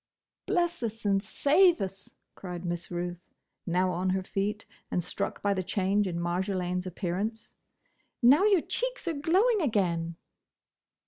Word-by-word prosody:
"Bless 350 Hz, -6 st, +1 dB
us 225 Hz, -1 st, -4 dB
and 195 Hz, -1 st, +2 dB
save 300 Hz, -, +4 dB
us!" 195 Hz, 0 st, -6 dB, 0.2 s
cried 180 Hz, -1 st, -7 dB
Miss 175 Hz, 0 st, -3 dB
Ruth, 175 Hz, 0 st, -4 dB, 0.5 s
now 180 Hz, +1 st, +2 dB
on 180 Hz, +2 st, -1 dB
her 190 Hz, 0 st, 0 dB
feet, 205 Hz, +3 st, -2 dB, 0.2 s
and 175 Hz, -, -1 dB
struck 180 Hz, -, -3 dB
by 200 Hz, 0 st, +3 dB
the 190 Hz, -, -1 dB
change 195 Hz, +2 st, +1 dB
in 170 Hz, -2 st, -3 dB
Marjolaine's 180 Hz, +1 st, -1 dB
appearance, 195 Hz, +5 st, -4 dB, 0.6 s
"now 270 Hz, +9 st, +6 dB
your 400 Hz, -5 st, +5 dB
cheeks -, -, -3 dB
are 335 Hz, -, +1 dB
glowing 375 Hz, +10 st, +2 dB
again!" 175 Hz, -, 0 dB
195 Hz, 140 wpm, -29 LUFS, 180-270 Hz, 0.6 s, now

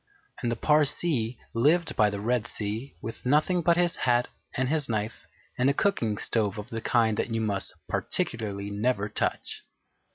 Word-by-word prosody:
And 120 Hz, -, 0 dB
the -, -, 0 dB
Parsee 145 Hz, -3 st, +2 dB, 0.2 s
lived 155 Hz, +9 st, +2 dB
by 105 Hz, -, +4 dB
the 100 Hz, -1 st, -4 dB
Red 120 Hz, +2 st, 0 dB
Sea 110 Hz, +5 st, -4 dB
with 115 Hz, -, -6 dB
nothing 155 Hz, +7 st, +3 dB
but 170 Hz, +1 st, +3 dB
his 175 Hz, -1 st, +2 dB
hat 120 Hz, -1 st, +2 dB, 0.3 s
and 130 Hz, 0 st, +1 dB
his 150 Hz, -2 st, +1 dB
knife 110 Hz, 0 st, -3 dB, 0.3 s
and 130 Hz, +2 st, +4 dB
a 140 Hz, -, +1 dB
cooking 115 Hz, -, +1 dB
stove 105 Hz, -2 st, 0 dB
of 105 Hz, +3 st, -7 dB
the 115 Hz, -1 st, -3 dB
kind 110 Hz, -3 st, +2 dB
that -, -, -1 dB
you 115 Hz, 0 st, -1 dB
must 100 Hz, -3 st, -1 dB
particularly 100 Hz, -3 st, -2 dB
never 105 Hz, 0 st, 0 dB
touch. -, -, -2 dB
115 Hz, 170 wpm, -27 LUFS, 105-140 Hz, 0.3 s, by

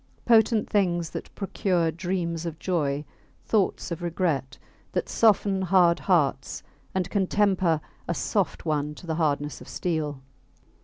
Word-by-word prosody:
Potent 225 Hz, -1 st, +4 dB
things 175 Hz, -5 st, +1 dB
that -, -, -6 dB
procure 180 Hz, -4 st, 0 dB
dreams 170 Hz, -1 st, -2 dB
of 160 Hz, -1 st, -5 dB
joy, 150 Hz, -5 st, -1 dB, 0.4 s
thoughts 200 Hz, -4 st, 0 dB
of 170 Hz, +1 st, -4 dB
regret; 160 Hz, -6 st, -1 dB, 0.4 s
that -, -, -1 dB
soften 200 Hz, -3 st, +3 dB
hard 180 Hz, -2 st, +4 dB
hearts, 145 Hz, -7 st, +1 dB, 0.3 s
and 185 Hz, -2 st, 0 dB
can 195 Hz, -3 st, +1 dB
temper 190 Hz, -6 st, +2 dB, 0.3 s
a 170 Hz, -, -1 dB
soft 195 Hz, -2 st, -1 dB
one 150 Hz, -1 st, -1 dB
to -, -, -12 dB
the 165 Hz, -, -2 dB
hardness 145 Hz, -1 st, 0 dB
of -, -, -11 dB
steel. 155 Hz, -5 st, -2 dB
175 Hz, 140 wpm, -26 LUFS, 155-190 Hz, 0.4 s, Potent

